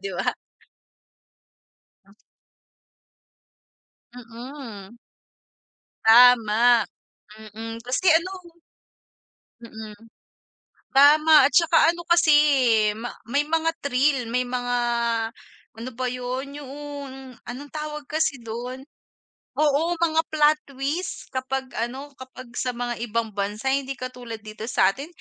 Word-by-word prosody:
di 410 - -4
ba? - - -2 1.8
Hmm 200 - -21
s - - -27 2.0
Mm. 235 -3 -10 1.1
Tama, 235 0 +6 0.7
mm, 225 +1 -6
kasi 250 +9 -2
ano. 345 0 -6 1.0
Mm, 220 -2 -10 1.0
tama 300 +1 +6
at 285 - 0
tsaka 335 -1 +4
ano 345 - -8
kasi, 340 -3 +5
eh, 250 -8 +3
ma 240 +2 -6 0.2
may 285 +4 +1
mga 325 +1 +1
thrill, 275 -2 +1
may 250 - +2
mga 245 0 -2 1.0
ano 235 +3 -6
ba 255 +2 -2
yun? 250 +2 -4
Yuong 280 -2 -9
anong 265 +5 -8
tawag 300 -1 -5
kasi 310 -4 -1
doon 240 +3 -6 0.8
oo, 305 +3 +2
mga 320 -1 +2
plot 305 0 +4
twist, 285 +7 -4
kapag 260 0 -3
ano, 260 +5 -4
kapag 260 -1 -11
sa 250 - -1
mga 240 0 -4
ibang 230 0 -1
bansa 205 +5 -3
hindi 275 -1 -2
katulad 250 -3 -7
dito 215 0 -9
sa'tin, 260 +5 +1
260 Hz, 105 wpm, -24 LUFS, 235-295 Hz, 2.0 s, Tama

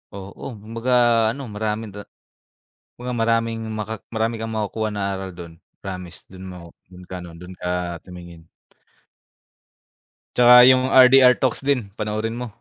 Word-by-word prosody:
Oo 100 0 -9 0.2
kumbaga 115 +3 -4 0.4
ano, 140 - -8
marami 105 +1 -2
da 105 - -9 0.9
kumbaga 125 +1 -7
maraming 115 0 0 0.2
maka 110 +1 -4 0.2
marami 115 +1 0
kang 115 0 -5
makukuha 110 0 -2
ng 100 -1 -3
aral 95 -1 -5
do'n, 85 -1 -11 0.3
promise 90 -3 -8
do'n 95 0 -12
mo, 90 - -10 0.3
do'n 90 0 -13
ka 95 - -6 0.2
do'n 90 +1 -10
ka 90 - -3 0.3
tumingin. 85 -2 -12 1.9
Tsaka 125 0 +8
yung 130 0 +4
RDR 130 -1 +7
talks 130 -3 -1
din 135 -7 0
panoorin 110 +1 -3
mo. 125 0 -5
110 Hz, 140 wpm, -21 LUFS, 95-125 Hz, 1.9 s, Tsaka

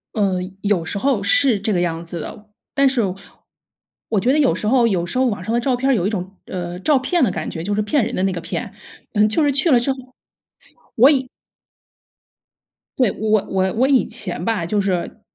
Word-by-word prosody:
嗯， 190 -2 -1
有 200 -4 +1
时 170 - -4
候 250 -1 +1
是 220 +2 +3
这 215 +1 -1
个 175 - +1
样 165 -1 -2
子 170 0 -7
的。 210 +6 -9 0.2
但 275 -1 +4
是 260 -2 +2 1.1
我 215 - +1
觉 245 +7 +2
得 305 - +2
有 280 - +3
时 210 - -3
候 240 -1 +4
有 180 -5 0
时 215 - -4
候 260 - +3
网 205 -7 -2
上 220 +3 -3
的 240 - +2
照 255 +1 +1
片 265 +2 -1
儿 - - +5
有 190 -6 0
一 - - +1
种， 190 -2 -5
呃， 175 -1 -5
“照 290 +9 +3
骗” 325 +5 +1
的 240 - +3
感 - - -4
觉， 160 - -6
就 205 +3 -1
是 215 - +1
骗 225 +4 +1
人 245 - -4
的 185 - -1
那 195 - +1
个 175 - -4
骗， - - -5 0.4
嗯， 210 -1 +4
就 295 +9 +1
是 290 - +3
去 280 +5 +1
了 245 - +6
之 245 +3 0
后， 265 - -4 1.1
我 - - +6
以 260 -1 -2 1.7
对， 250 -6 +3
我 215 -1 +1
我 190 -1 +1
我 255 +4 +2
以 270 -3 +4
前 180 -4 -4
吧， 210 -6 -1
就 205 +3 0
是 190 +2 -2
215 Hz, 240 characters per minute, -20 LUFS, 185-255 Hz, 1.7 s, 了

